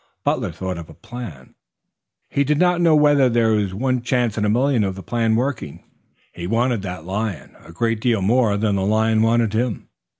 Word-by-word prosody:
Butler -, -, 0 dB
thought 95 Hz, -2 st, -5 dB
of 85 Hz, -, -10 dB
a 80 Hz, -, -13 dB
plan. 85 Hz, -, -9 dB, 0.7 s
He 140 Hz, -, 0 dB
did 150 Hz, +1 st, +1 dB
not 180 Hz, +1 st, +2 dB
know 165 Hz, -2 st, +5 dB
whether 145 Hz, -3 st, +4 dB
there 115 Hz, -1 st, +2 dB
were 105 Hz, -2 st, +1 dB
one 125 Hz, +6 st, -1 dB
chance 120 Hz, -3 st, 0 dB
in 105 Hz, -, -1 dB
a -, -, +1 dB
million 125 Hz, +1 st, +2 dB
of 95 Hz, -1 st, -2 dB
the 95 Hz, -, -9 dB
plan 115 Hz, -2 st, 0 dB
working. 120 Hz, -, -3 dB, 0.5 s
He 85 Hz, 0 st, -6 dB
wanted 115 Hz, +1 st, +1 dB
that 90 Hz, -4 st, -6 dB
lion 95 Hz, -5 st, -4 dB
a -, -, -13 dB
great 115 Hz, +5 st, -1 dB
deal 115 Hz, -5 st, +1 dB
more 110 Hz, 0 st, +2 dB
than 105 Hz, -1 st, 0 dB
the -, -, -1 dB
lion 110 Hz, +2 st, +2 dB
wanted 115 Hz, -1 st, +2 dB
him. 115 Hz, -1 st, -2 dB
110 Hz, 200 wpm, -21 LUFS, 100-125 Hz, 0.7 s, know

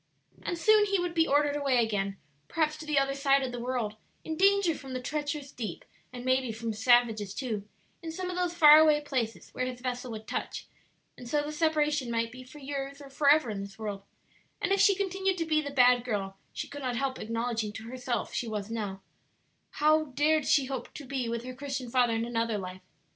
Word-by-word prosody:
And 345 Hz, -, -3 dB
soon 425 Hz, +5 st, +5 dB
he 395 Hz, 0 st, +2 dB
would 355 Hz, -1 st, -2 dB
be 330 Hz, -1 st, +3 dB
ordered 290 Hz, 0 st, +3 dB
away 280 Hz, -3 st, +1 dB
again, 200 Hz, -4 st, 0 dB, 0.3 s
perhaps 310 Hz, -2 st, 0 dB
to 310 Hz, 0 st, -9 dB
the 300 Hz, -2 st, +1 dB
other 275 Hz, 0 st, +3 dB
side 275 Hz, 0 st, +3 dB
of 255 Hz, -, -3 dB
the 245 Hz, -, -5 dB
world; 235 Hz, -3 st, -2 dB, 0.3 s
in 320 Hz, -, -4 dB
danger 390 Hz, -1 st, +4 dB
from 270 Hz, -3 st, -8 dB
the 255 Hz, -, -2 dB
treacherous 290 Hz, +1 st, -3 dB
deep 215 Hz, -9 st, -6 dB, 0.3 s
and 250 Hz, 0 st, -8 dB
maybe 255 Hz, -2 st, +2 dB
from 225 Hz, 0 st, -4 dB
savages, 225 Hz, -3 st, +3 dB
too, 220 Hz, -6 st, -3 dB, 0.3 s
in 330 Hz, -1 st, -5 dB
some 365 Hz, +2 st, -4 dB
of -, -, -5 dB
those 355 Hz, -1 st, -1 dB
far 305 Hz, -2 st, +9 dB
away 305 Hz, -1 st, +5 dB
places 255 Hz, -6 st, -3 dB
where 255 Hz, -, -2 dB
his 250 Hz, -1 st, -6 dB
vessel 250 Hz, 0 st, -4 dB
would 220 Hz, -1 st, -7 dB
touch; -, -, -4 dB, 0.5 s
and 245 Hz, -, -10 dB
so 295 Hz, +1 st, +1 dB
the 295 Hz, -, -4 dB
separation 300 Hz, -4 st, +1 dB
might 230 Hz, 0 st, -1 dB
be 255 Hz, +1 st, -10 dB
for 255 Hz, +4 st, -14 dB
years 275 Hz, 0 st, -5 dB
or 280 Hz, -1 st, -12 dB
forever 285 Hz, -3 st, +4 dB
in 200 Hz, -2 st, -4 dB
this 200 Hz, +1 st, -9 dB
world; 205 Hz, -3 st, -4 dB, 0.6 s
and -, -, -1 dB
if 395 Hz, -, +3 dB
she 400 Hz, -1 st, +6 dB
continued 385 Hz, -1 st, -1 dB
to 330 Hz, -, -1 dB
be 310 Hz, -1 st, +2 dB
the 285 Hz, -, -5 dB
bad 250 Hz, -3 st, +5 dB
girl 200 Hz, -5 st, -3 dB, 0.2 s
she -, -, -5 dB
could 285 Hz, +1 st, -8 dB
not 250 Hz, -2 st, -2 dB
help 270 Hz, +1 st, -2 dB
acknowledging 230 Hz, -1 st, -2 dB
to 220 Hz, -, -8 dB
herself 245 Hz, 0 st, -3 dB
she 240 Hz, -, -2 dB
now -, -, -5 dB
was, 205 Hz, -2 st, -4 dB, 0.7 s
how 310 Hz, +1 st, +3 dB
dared 295 Hz, +2 st, +1 dB
she 275 Hz, -, +4 dB
hope 260 Hz, -2 st, -5 dB
to 290 Hz, -, -8 dB
be 255 Hz, -3 st, -2 dB
with 235 Hz, 0 st, -3 dB
her 255 Hz, 0 st, -6 dB
Christian 270 Hz, -2 st, -5 dB
father 245 Hz, -2 st, +3 dB
in 225 Hz, +1 st, 0 dB
another 230 Hz, -2 st, -1 dB
life? 185 Hz, -1 st, -7 dB
260 Hz, 220 wpm, -29 LUFS, 230-300 Hz, 0.7 s, far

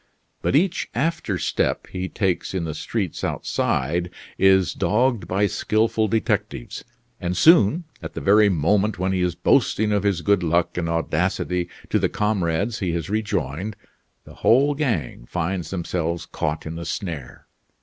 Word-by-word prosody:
But -, -, +1 dB
each 175 Hz, +4 st, +1 dB
after 140 Hz, -, -1 dB
step -, -, -1 dB
he 95 Hz, 0 st, -5 dB
takes 95 Hz, -2 st, -1 dB
in 90 Hz, -, -1 dB
the 80 Hz, -2 st, -3 dB
streets -, -, -3 dB
outside 85 Hz, +6 st, -1 dB, 0.3 s
is 95 Hz, -3 st, +4 dB
dogged 120 Hz, +1 st, +1 dB
by 100 Hz, +3 st, +1 dB
skilful 110 Hz, +2 st, +1 dB
detectives; 105 Hz, -, -2 dB, 0.4 s
and 90 Hz, 0 st, -2 dB
soon, 165 Hz, -, +5 dB, 0.2 s
at -, -, -8 dB
the -, -, -3 dB
very 105 Hz, +1 st, +5 dB
moment 100 Hz, +5 st, +1 dB
when 95 Hz, +2 st, 0 dB
he 95 Hz, -1 st, 0 dB
is 90 Hz, -2 st, 0 dB
boasting 105 Hz, 0 st, +2 dB
of 105 Hz, -1 st, +2 dB
his 100 Hz, -5 st, 0 dB
good 100 Hz, -2 st, +3 dB
luck 85 Hz, 0 st, +1 dB
and 85 Hz, -2 st, -2 dB
audacity 90 Hz, +2 st, -1 dB, 0.2 s
to -, -, +3 dB
the -, -, +1 dB
comrades 105 Hz, 0 st, 0 dB
he 90 Hz, -3 st, -1 dB
has 85 Hz, +2 st, -3 dB
rejoined, 100 Hz, -3 st, -2 dB, 0.5 s
the -, -, -13 dB
whole 140 Hz, +5 st, +3 dB
gang 110 Hz, -, -2 dB
find 90 Hz, 0 st, -2 dB
themselves 85 Hz, -2 st, -3 dB
caught 75 Hz, 0 st, -3 dB
in 80 Hz, +1 st, -5 dB
the 85 Hz, -, -6 dB
snare. 80 Hz, -10 st, -5 dB
95 Hz, 155 wpm, -23 LUFS, 85-105 Hz, 0.5 s, soon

